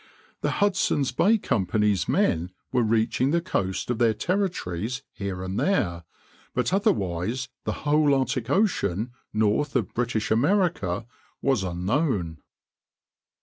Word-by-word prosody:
The -, -, 0 dB
Hudson's 190 Hz, -9 st, +1 dB
Bay 200 Hz, -, +4 dB
Company's 105 Hz, -, +1 dB
men 85 Hz, +2 st, +2 dB, 0.2 s
were 125 Hz, -, +2 dB
reaching 115 Hz, +3 st, +2 dB
the 170 Hz, +3 st, +2 dB
coast 100 Hz, -, -2 dB
of 120 Hz, -, -2 dB
their 115 Hz, -2 st, +3 dB
Territories 125 Hz, -, -2 dB
here 95 Hz, -2 st, -5 dB
and 95 Hz, +2 st, -3 dB
there; 85 Hz, -, 0 dB, 0.5 s
but -, -, 0 dB
otherwise 125 Hz, -, 0 dB, 0.2 s
the -, -, 0 dB
whole 145 Hz, -1 st, +4 dB
Arctic 130 Hz, -3 st, -1 dB
Ocean 125 Hz, -, +1 dB, 0.2 s
north 110 Hz, +8 st, +1 dB
of 125 Hz, -, 0 dB
British 115 Hz, -2 st, -1 dB
America 135 Hz, -, +1 dB, 0.4 s
was 135 Hz, -6 st, +2 dB
unknown. 90 Hz, -, -1 dB
115 Hz, 120 wpm, -25 LUFS, 95-150 Hz, 0.5 s, Bay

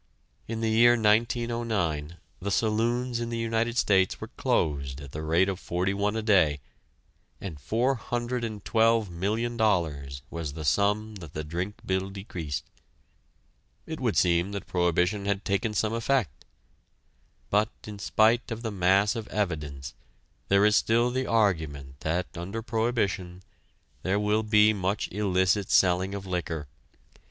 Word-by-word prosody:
In 115 Hz, 0 st, -4 dB
the 110 Hz, -1 st, +1 dB
year 120 Hz, +2 st, +6 dB
1909 110 Hz, -8 st, 0 dB, 0.2 s
the 100 Hz, -, -2 dB
saloons 115 Hz, +4 st, 0 dB
in 120 Hz, 0 st, -3 dB
the 115 Hz, -, -3 dB
United 115 Hz, +1 st, -1 dB
States 95 Hz, -5 st, +3 dB
were -, -, -7 dB
closed 70 Hz, -3 st, -1 dB
at 70 Hz, -2 st, -10 dB
the 75 Hz, -, -5 dB
rate 80 Hz, +4 st, +2 dB
of 95 Hz, -2 st, -2 dB
forty 90 Hz, +3 st, -1 dB
one 100 Hz, +2 st, 0 dB
a 110 Hz, -, -2 dB
day, 90 Hz, -9 st, +3 dB, 0.8 s
and 85 Hz, -7 st, -7 dB
$412,000,000 110 Hz, -, 0 dB
was 80 Hz, -4 st, -4 dB
the 80 Hz, 0 st, -6 dB
sum 105 Hz, +6 st, +1 dB
that 80 Hz, -6 st, -11 dB
the 75 Hz, -, -4 dB
drink 90 Hz, +7 st, -5 dB
bill 95 Hz, 0 st, -1 dB
decreased. 90 Hz, -7 st, -5 dB, 1.2 s
It -, -, -6 dB
would -, -, 0 dB
seem 85 Hz, +2 st, +2 dB
that 100 Hz, -, -5 dB
prohibition 90 Hz, +3 st, +1 dB
had 100 Hz, +1 st, -1 dB
taken 105 Hz, +2 st, 0 dB
some 110 Hz, +2 st, +1 dB
effect. 115 Hz, -, -1 dB, 1.1 s
But, 105 Hz, +2 st, +3 dB, 0.2 s
in 105 Hz, -1 st, -8 dB
spite 110 Hz, +4 st, +2 dB
of 115 Hz, 0 st, -5 dB
the 110 Hz, -, -2 dB
mass 100 Hz, +3 st, +3 dB
of 115 Hz, -2 st, -5 dB
evidence, 75 Hz, -8 st, -3 dB, 0.5 s
there 100 Hz, +1 st, +4 dB
is 105 Hz, 0 st, +4 dB
still 120 Hz, +3 st, +3 dB
the 130 Hz, +1 st, -1 dB
argument 80 Hz, -11 st, 0 dB
that, 85 Hz, +3 st, -1 dB
under 95 Hz, +7 st, -5 dB
prohibition, 110 Hz, -6 st, -1 dB, 0.6 s
there 95 Hz, +2 st, 0 dB
will 105 Hz, +1 st, +2 dB
be 105 Hz, 0 st, +5 dB
much 100 Hz, 0 st, -1 dB
illicit 95 Hz, 0 st, +1 dB
selling 95 Hz, +1 st, +3 dB
of 100 Hz, -1 st, -6 dB
liquor. 85 Hz, -5 st, -3 dB
100 Hz, 140 wpm, -27 LUFS, 90-110 Hz, 1.2 s, year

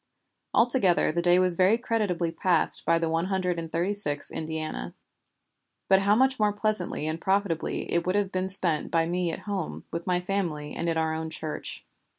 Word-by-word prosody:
Altogether 230 Hz, -, +4 dB
the 170 Hz, +2 st, -1 dB
day 175 Hz, +1 st, +4 dB
was 185 Hz, -1 st, +3 dB
very 190 Hz, +5 st, +4 dB
creditably 205 Hz, -8 st, -1 dB
passed 170 Hz, 0 st, 0 dB
by 165 Hz, -, +4 dB
the 165 Hz, 0 st, -1 dB
One 165 Hz, +1 st, 0 dB
Hundred 185 Hz, -2 st, -1 dB
and 165 Hz, -1 st, -6 dB
Thirty 175 Hz, +5 st, 0 dB
sixth 145 Hz, -8 st, -2 dB
Indiana. 155 Hz, -, -5 dB, 0.9 s
But 190 Hz, 0 st, +5 dB
how 200 Hz, +1 st, +4 dB
much 265 Hz, +2 st, +2 dB
more 210 Hz, -1 st, +3 dB
pleasantly 205 Hz, -6 st, -2 dB
and 160 Hz, +1 st, -3 dB
profitably 190 Hz, -4 st, 0 dB
it 170 Hz, +1 st, 0 dB
would 185 Hz, -, +1 dB
have 205 Hz, -2 st, 0 dB
been 185 Hz, 0 st, -1 dB
spent 175 Hz, -5 st, +2 dB
by 165 Hz, -1 st, +2 dB
me 175 Hz, 0 st, -1 dB
at -, -, -6 dB
home, 200 Hz, -5 st, -4 dB
with 170 Hz, +2 st, -4 dB
my 180 Hz, -, +2 dB
own 180 Hz, -, 0 dB
family 170 Hz, -6 st, -3 dB
and 170 Hz, -, -2 dB
in 165 Hz, -, 0 dB
our 160 Hz, 0 st, 0 dB
own 160 Hz, 0 st, -4 dB
church." 155 Hz, -1 st, -5 dB
180 Hz, 195 wpm, -27 LUFS, 165-195 Hz, 0.9 s, But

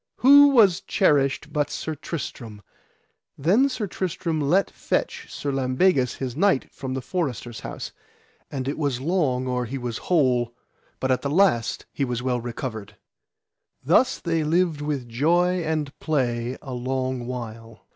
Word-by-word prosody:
Who 285 Hz, +3 st, +8 dB
was 220 Hz, -10 st, +5 dB
cherished 145 Hz, -8 st, +1 dB
but 145 Hz, -1 st, 0 dB
Sir 155 Hz, +1 st, -4 dB
Tristram! 120 Hz, -9 st, -7 dB, 0.7 s
Then 205 Hz, -, +3 dB
Sir 250 Hz, -5 st, -3 dB
Tristram 170 Hz, -4 st, -2 dB
let 175 Hz, +8 st, +2 dB
fetch -, -, -2 dB
Sir 145 Hz, -, -3 dB
Lambegus, 130 Hz, 0 st, +2 dB
his 130 Hz, -2 st, -4 dB
knight, 185 Hz, -3 st, +2 dB
from 130 Hz, -1 st, -5 dB
the 130 Hz, -, -4 dB
forester's 125 Hz, -, -3 dB
house, -, -, -6 dB, 0.6 s
and 135 Hz, -2 st, -4 dB
it 140 Hz, -, -3 dB
was 140 Hz, -5 st, 0 dB
long 140 Hz, -5 st, 0 dB
or 125 Hz, -1 st, -1 dB
he 130 Hz, +4 st, -5 dB
was 120 Hz, -3 st, -4 dB
whole, 125 Hz, -8 st, +2 dB, 0.4 s
but 130 Hz, -, 0 dB
at 130 Hz, -, +1 dB
the 140 Hz, -, -2 dB
last 150 Hz, -8 st, +2 dB
he 140 Hz, -, -1 dB
was 125 Hz, -2 st, -2 dB
well 125 Hz, -2 st, 0 dB
recovered. 110 Hz, -3 st, -6 dB, 0.9 s
Thus 260 Hz, -, +3 dB
they 165 Hz, -2 st, 0 dB
lived 165 Hz, -1 st, +1 dB
with 145 Hz, -4 st, -3 dB
joy 175 Hz, +9 st, +2 dB
and 155 Hz, -3 st, -2 dB
play 125 Hz, -5 st, -1 dB
a 135 Hz, -, -6 dB
long 130 Hz, 0 st, -2 dB
while. 115 Hz, -2 st, -7 dB
135 Hz, 150 wpm, -24 LUFS, 125-165 Hz, 0.9 s, Who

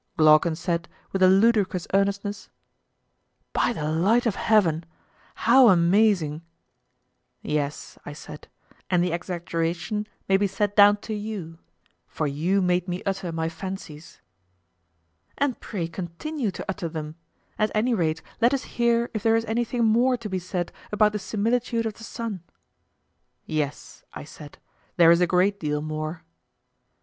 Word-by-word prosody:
Glaucon 155 Hz, +1 st, +5 dB
said, 170 Hz, -1 st, -2 dB, 0.2 s
with 195 Hz, -, -2 dB
a 185 Hz, -, +7 dB
ludicrous 195 Hz, -2 st, +3 dB
earnestness: 200 Hz, +1 st, -1 dB, 1.0 s
By -, -, +2 dB
the 155 Hz, -10 st, -3 dB
light 205 Hz, +10 st, +2 dB
of 230 Hz, -, +2 dB
heaven, 180 Hz, -7 st, +2 dB, 0.5 s
how 250 Hz, +1 st, +6 dB
amazing! 175 Hz, -3 st, +3 dB, 1.0 s
Yes, 150 Hz, -1 st, -3 dB
I -, -, -7 dB
said, 150 Hz, 0 st, -11 dB, 0.4 s
and 180 Hz, -2 st, +3 dB
the 180 Hz, -, 0 dB
exaggeration 170 Hz, +4 st, -3 dB, 0.2 s
may 195 Hz, -, +4 dB
be 200 Hz, +1 st, +1 dB
set 205 Hz, +1 st, -2 dB
down 205 Hz, 0 st, +7 dB
to 220 Hz, -, -5 dB
you; 205 Hz, -6 st, -6 dB, 0.5 s
for 155 Hz, -, -3 dB
you 170 Hz, +7 st, 0 dB
made 180 Hz, 0 st, +1 dB
me 180 Hz, 0 st, -4 dB
utter 190 Hz, -3 st, -3 dB
my 160 Hz, 0 st, -2 dB
fancies. 165 Hz, -2 st, -8 dB, 1.2 s
And 280 Hz, -3 st, 0 dB
pray 180 Hz, -7 st, -4 dB
continue 195 Hz, -, -4 dB
to 185 Hz, -, -7 dB
utter 190 Hz, -3 st, -3 dB
them; 155 Hz, -1 st, -6 dB, 0.5 s
at 215 Hz, 0 st, +2 dB
any 235 Hz, +4 st, +2 dB
rate 165 Hz, -5 st, -1 dB, 0.2 s
let 240 Hz, +4 st, +4 dB
us 265 Hz, -, -4 dB
hear 235 Hz, 0 st, 0 dB
if 215 Hz, -, -3 dB
there 225 Hz, +1 st, +3 dB
is 225 Hz, 0 st, 0 dB
anything 235 Hz, +1 st, 0 dB
more 245 Hz, +3 st, +3 dB
to 230 Hz, -2 st, -7 dB
be 190 Hz, -2 st, -2 dB
said 180 Hz, -1 st, -4 dB, 0.2 s
about 210 Hz, 0 st, +3 dB
the 210 Hz, -, -3 dB
similitude 230 Hz, +3 st, -1 dB
of 220 Hz, -, -2 dB
the 225 Hz, -, -14 dB
sun. 225 Hz, -4 st, -5 dB, 1.0 s
Yes, 150 Hz, -2 st, -4 dB
I -, -, -6 dB
said, 145 Hz, 0 st, -12 dB, 0.4 s
there 170 Hz, -1 st, +7 dB
is 170 Hz, +1 st, +4 dB
a 180 Hz, -, +4 dB
great 190 Hz, +3 st, +2 dB
deal 150 Hz, -3 st, -1 dB
more. 155 Hz, +2 st, -5 dB
190 Hz, 150 wpm, -25 LUFS, 165-215 Hz, 1.2 s, a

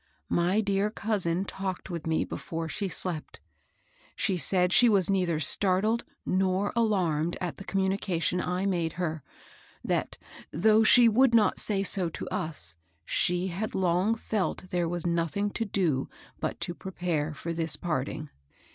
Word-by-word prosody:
My 180 Hz, +5 st, +2 dB
dear 200 Hz, 0 st, +1 dB
cousin 195 Hz, -5 st, -1 dB
talked 190 Hz, -1 st, -5 dB
with 170 Hz, -2 st, -5 dB
me 160 Hz, 0 st, +1 dB
before 165 Hz, 0 st, -5 dB
she 195 Hz, +5 st, -3 dB
slept. 175 Hz, -2 st, -3 dB, 0.8 s
She 190 Hz, -, 0 dB
said 180 Hz, +3 st, +2 dB
she 245 Hz, -, +7 dB
was 195 Hz, -3 st, +3 dB
neither 180 Hz, -5 st, +1 dB
stailled 200 Hz, -, +2 dB, 0.2 s
nor 190 Hz, +1 st, +1 dB
alarmed 175 Hz, -8 st, +1 dB
at 180 Hz, -3 st, -4 dB
the -, -, -8 dB
communication 190 Hz, -2 st, 0 dB
I 180 Hz, +2 st, -2 dB
made 170 Hz, -4 st, 0 dB
her; 160 Hz, -3 st, -3 dB, 0.6 s
that, -, -, -1 dB, 0.3 s
though 215 Hz, +7 st, +4 dB
she 240 Hz, +2 st, +7 dB
would 235 Hz, +2 st, +4 dB
not 210 Hz, -4 st, +3 dB
say 195 Hz, -2 st, 0 dB
so 185 Hz, -3 st, +1 dB
to -, -, -7 dB
us, 155 Hz, -, -4 dB, 0.3 s
she 180 Hz, +1 st, +1 dB
had 195 Hz, +5 st, -4 dB
long 185 Hz, +4 st, +2 dB
felt 200 Hz, -4 st, -3 dB
there 175 Hz, -2 st, 0 dB
was 175 Hz, 0 st, -3 dB
nothing 170 Hz, +4 st, 0 dB
to 225 Hz, -, -2 dB
do 170 Hz, -10 st, 0 dB, 0.3 s
but -, -, -3 dB
to 175 Hz, -, -2 dB
prepare 170 Hz, -4 st, -3 dB
for 170 Hz, +2 st, -4 dB
this 165 Hz, -1 st, 0 dB
parting. 155 Hz, -2 st, -3 dB
185 Hz, 150 wpm, -28 LUFS, 170-200 Hz, 0.8 s, she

